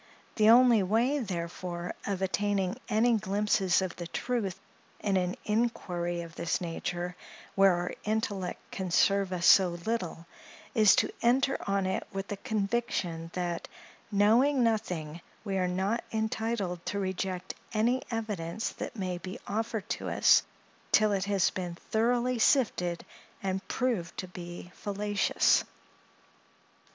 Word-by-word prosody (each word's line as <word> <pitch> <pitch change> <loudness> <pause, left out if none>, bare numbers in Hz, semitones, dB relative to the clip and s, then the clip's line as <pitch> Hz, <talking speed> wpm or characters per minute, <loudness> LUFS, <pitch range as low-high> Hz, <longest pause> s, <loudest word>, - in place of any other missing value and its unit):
The 215 0 +5
only 240 -2 +7
way, 230 +9 +2
therefore, 175 -4 -4
of 195 -2 -1
attaining 195 +1 0
any 230 +1 +3
glimpses 200 -2 +2
of 185 -1 -4
the 175 - -5
truth 200 -2 -2 0.4
in 200 -2 0
an 180 0 0
inquiry 180 -6 -1
of 170 -1 -9
this 170 0 -1
nature, 175 +1 -4 0.4
where 195 -1 +5
our 175 0 -2
intellect 210 -4 -3
can 190 -2 -4
serve 195 +2 +3
us 175 -2 -1
so 180 -3 +6
little, 185 -7 -2 0.5
is 215 -3 +6
to - - +1
enter 260 +3 +3
on 195 -1 +1
it 190 - -2
with 195 0 -5
the 205 - -3
conviction 200 -7 -2
that, 175 -2 -3 0.4
knowing 240 +7 +4
nothing, 180 -8 -1 0.2
we 195 -3 -1
are 180 - +1
not 190 +6 -1
entitled 220 -5 -2
to 200 - -2
reject 190 -1 -3 0.2
any 235 +4 +2
evidence 215 -3 -3
that - - -6
may 185 -4 -3
be 185 +1 -7
offered 220 0 -2
to - - -3
us, - - +5 0.5
till 215 -1 +5
it 195 -1 0
has 200 -2 +2
been 180 -2 -4 0.2
thoroughly 240 +2 +2
sifted, 190 -9 +2 0.4
and 190 0 -2
proved 225 -10 -1
to 185 - -4
be 175 0 -9
fallacious. 205 0 +1
195 Hz, 135 wpm, -29 LUFS, 180-220 Hz, 0.5 s, only